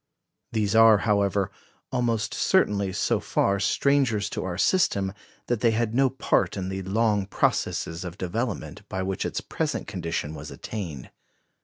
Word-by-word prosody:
These 105 Hz, -3 st, 0 dB
are, 110 Hz, -1 st, +7 dB
however, 100 Hz, -2 st, +1 dB, 0.4 s
almost 115 Hz, -3 st, 0 dB
certainly 100 Hz, -, +2 dB
so -, -, +1 dB
far 100 Hz, 0 st, +1 dB
strangers 130 Hz, -2 st, +2 dB
to -, -, -3 dB
our 90 Hz, -1 st, -3 dB
system 100 Hz, -, +2 dB, 0.3 s
that 120 Hz, -2 st, 0 dB
they 115 Hz, -, +4 dB
had 115 Hz, 0 st, 0 dB
no 135 Hz, +2 st, +4 dB
part 105 Hz, -7 st, 0 dB
in 95 Hz, -1 st, -3 dB
the 95 Hz, 0 st, -3 dB
long 105 Hz, 0 st, +1 dB
processes 85 Hz, -3 st, 0 dB
of 90 Hz, 0 st, -7 dB
development 105 Hz, +5 st, -3 dB
by 95 Hz, 0 st, -2 dB
which 95 Hz, 0 st, -2 dB
its -, -, -3 dB
present -, -, -2 dB
condition 80 Hz, -2 st, -3 dB
was 75 Hz, -1 st, -8 dB
attained. 85 Hz, -, -6 dB
100 Hz, 150 wpm, -26 LUFS, 95-115 Hz, 0.4 s, are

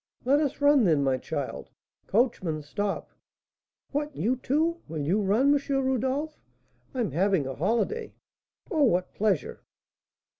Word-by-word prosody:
"Let 280 Hz, +3 st, +4 dB
us 290 Hz, -2 st, -1 dB
run, 285 Hz, -3 st, +5 dB
then, 155 Hz, -7 st, +3 dB
my 130 Hz, -1 st, +1 dB
child. -, -, -5 dB, 0.4 s
Coachman, 185 Hz, -, 0 dB
stop." 200 Hz, +7 st, -3 dB, 0.8 s
"What! 295 Hz, 0 st, -2 dB
You, 255 Hz, +4 st, 0 dB
too? 320 Hz, +7 st, 0 dB
Will 160 Hz, 0 st, -6 dB
you 190 Hz, +8 st, +2 dB
run, 225 Hz, +9 st, +3 dB
M. 290 Hz, -, +3 dB, 0.2 s
Rodolph?" 265 Hz, +3 st, -1 dB, 0.6 s
"I'm 235 Hz, -, -1 dB
having 185 Hz, 0 st, +2 dB
a 135 Hz, -, -4 dB
holiday." 235 Hz, -, -1 dB, 0.6 s
"Oh! 320 Hz, -5 st, +1 dB
What 185 Hz, -9 st, +2 dB
pleasure!" 205 Hz, -7 st, -1 dB
235 Hz, 135 wpm, -27 LUFS, 180-285 Hz, 0.8 s, run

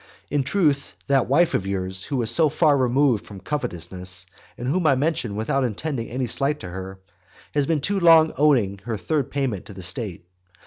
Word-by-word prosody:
In 145 Hz, 0 st, +2 dB
truth, 145 Hz, -2 st, 0 dB
that 135 Hz, -2 st, +2 dB
wife 160 Hz, +7 st, +3 dB
of 95 Hz, -, -1 dB
yours, 95 Hz, -1 st, -3 dB
who 135 Hz, -, -2 dB
is 110 Hz, -, +2 dB
so 160 Hz, -2 st, +4 dB
far 150 Hz, 0 st, +3 dB
removed 130 Hz, -3 st, +2 dB
from 100 Hz, -2 st, -11 dB
covetousness, 90 Hz, -, -3 dB, 0.3 s
and 120 Hz, -, -5 dB
whom 165 Hz, +4 st, +1 dB
I 135 Hz, -, +5 dB
mention 130 Hz, -6 st, -1 dB
without 120 Hz, +6 st, 0 dB
intending 120 Hz, +1 st, -3 dB
any 125 Hz, +2 st, -2 dB
slight 140 Hz, +5 st, 0 dB
to 95 Hz, -, -7 dB
her, 95 Hz, +1 st, -7 dB, 0.5 s
has 145 Hz, -2 st, +1 dB
been 160 Hz, -3 st, +1 dB
too 195 Hz, +6 st, 0 dB
long 165 Hz, -2 st, +6 dB
owing 125 Hz, -9 st, +2 dB
her 115 Hz, -2 st, -2 dB
third 145 Hz, +4 st, -1 dB
payment 130 Hz, -9 st, -2 dB
to 105 Hz, -, -10 dB
the 95 Hz, -1 st, -9 dB
state. 90 Hz, 0 st, -4 dB
130 Hz, 190 wpm, -23 LUFS, 100-150 Hz, 0.5 s, long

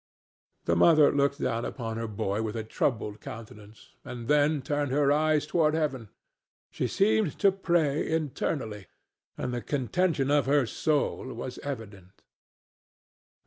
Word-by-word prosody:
The 85 Hz, -, +2 dB
mother 155 Hz, -, +6 dB
looked 140 Hz, 0 st, +1 dB
down 115 Hz, 0 st, -1 dB
upon 115 Hz, -4 st, -4 dB
her 115 Hz, 0 st, -3 dB
boy 100 Hz, 0 st, -2 dB
with 110 Hz, 0 st, -3 dB
a 110 Hz, -, -3 dB
troubled 110 Hz, -2 st, -2 dB
countenance, 110 Hz, -1 st, -11 dB
and 120 Hz, -2 st, -7 dB
then 150 Hz, 0 st, +3 dB
turned 145 Hz, -1 st, -1 dB
her 140 Hz, 0 st, +3 dB
eyes 155 Hz, 0 st, +2 dB
upward 155 Hz, -1 st, +2 dB
to 160 Hz, -, +1 dB
heaven. 130 Hz, -8 st, -2 dB, 0.6 s
She -, -, -2 dB
seemed 110 Hz, +6 st, +1 dB
to 200 Hz, -, +4 dB
pray 170 Hz, -6 st, 0 dB
internally, 135 Hz, -, -2 dB, 0.5 s
and 125 Hz, -, -3 dB
the 120 Hz, -, -2 dB
contention 145 Hz, +2 st, 0 dB
of 145 Hz, -2 st, +3 dB
her 140 Hz, -1 st, +3 dB
soul 145 Hz, +5 st, -1 dB
was 125 Hz, +2 st, -6 dB
evident. 105 Hz, -9 st, -8 dB
135 Hz, 145 wpm, -28 LUFS, 110-150 Hz, 0.6 s, mother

